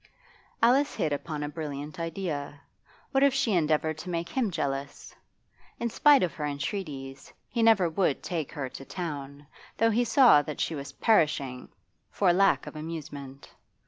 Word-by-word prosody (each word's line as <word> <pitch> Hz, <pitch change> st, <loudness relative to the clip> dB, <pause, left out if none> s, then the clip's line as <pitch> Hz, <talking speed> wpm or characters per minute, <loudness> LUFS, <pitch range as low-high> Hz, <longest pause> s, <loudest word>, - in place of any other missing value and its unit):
Alice 270 Hz, +5 st, +4 dB
hit 155 Hz, -2 st, 0 dB
upon 150 Hz, +1 st, -4 dB
a -, -, -2 dB
brilliant 150 Hz, -1 st, -6 dB
idea. 165 Hz, -4 st, -4 dB, 0.5 s
What 270 Hz, -, +2 dB
if 280 Hz, -1 st, +4 dB
she 270 Hz, -6 st, +1 dB
endeavoured 155 Hz, -2 st, +1 dB
to 180 Hz, -, -7 dB
make 170 Hz, -1 st, -3 dB
him 250 Hz, -5 st, 0 dB
jealous? 140 Hz, -4 st, -4 dB, 0.7 s
In 235 Hz, -1 st, -2 dB
spite 290 Hz, +1 st, +5 dB
of 175 Hz, -, -1 dB
her 150 Hz, -, -6 dB
entreaties, 140 Hz, -2 st, -5 dB, 0.2 s
he 235 Hz, -, -2 dB
never 220 Hz, -6 st, +5 dB
would 160 Hz, -4 st, 0 dB
take 160 Hz, -5 st, -3 dB
her 145 Hz, -3 st, -3 dB
to 130 Hz, -, -9 dB
town, 145 Hz, -4 st, -6 dB, 0.3 s
though 225 Hz, 0 st, +3 dB
he 235 Hz, +3 st, +2 dB
saw 240 Hz, -, +6 dB
that 150 Hz, 0 st, -7 dB
she -, -, -1 dB
was 140 Hz, -2 st, -6 dB
perishing 145 Hz, -, +1 dB, 0.4 s
for 185 Hz, -4 st, +2 dB
lack 195 Hz, +2 st, +3 dB
of -, -, -9 dB
amusement. 145 Hz, -4 st, -8 dB
160 Hz, 160 wpm, -28 LUFS, 145-195 Hz, 0.7 s, saw